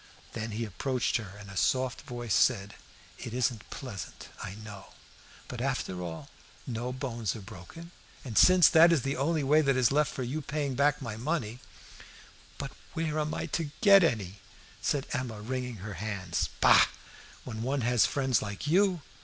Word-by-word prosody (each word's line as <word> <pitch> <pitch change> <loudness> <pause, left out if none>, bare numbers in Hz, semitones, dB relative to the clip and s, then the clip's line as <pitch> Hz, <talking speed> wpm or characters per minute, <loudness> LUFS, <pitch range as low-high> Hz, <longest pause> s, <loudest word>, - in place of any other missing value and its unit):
Then 115 0 -4
he 115 +2 -2
approached 125 +5 -1
her, 105 -5 -8
and 105 -1 -11
in 95 - -10
a - - -11
soft 130 +5 +1
voice 120 -4 -4
said 100 -4 +2 0.5
"It 120 - -6
isn't 120 -3 -1
pleasant, 100 -10 -8
I 95 0 -6
know; 105 -2 -11 0.5
but, 120 -2 -6
after 130 -9 -2
all, 85 -2 -7 0.3
no 120 0 -3
bones 120 -5 -3
are - - -6
broken, 110 - -11 0.3
and, 120 -4 -6
since 185 - +7
that 170 +1 +7
is 155 -7 +2
the 135 +1 -1
only 150 +3 0
way 150 +3 +4
that 135 -3 +2
is 125 -1 +3
left 150 +1 +2
for 130 - -4
you 140 +6 -3
paying 145 -1 -2
back 140 +2 +2
my 110 -3 -5
money 125 -3 -2 0.5
" - - -22
"But - - -5 0.2
where 155 -1 -1
am 155 0 -1
I - - -3
to 165 -3 -1
get 200 -4 +8
any?" 100 - -1 0.4
said 140 -2 0
Emma, 120 -4 -3
wringing 125 +2 -4
her 105 - -5
hands. 95 -2 -2
"Bah! - - +7 0.6
when 110 -3 -6
one 135 +3 -1
has 120 -1 +3
friends 130 -4 +1
like 105 +2 -5
you!" 180 0 +2
125 Hz, 180 wpm, -29 LUFS, 110-145 Hz, 0.6 s, get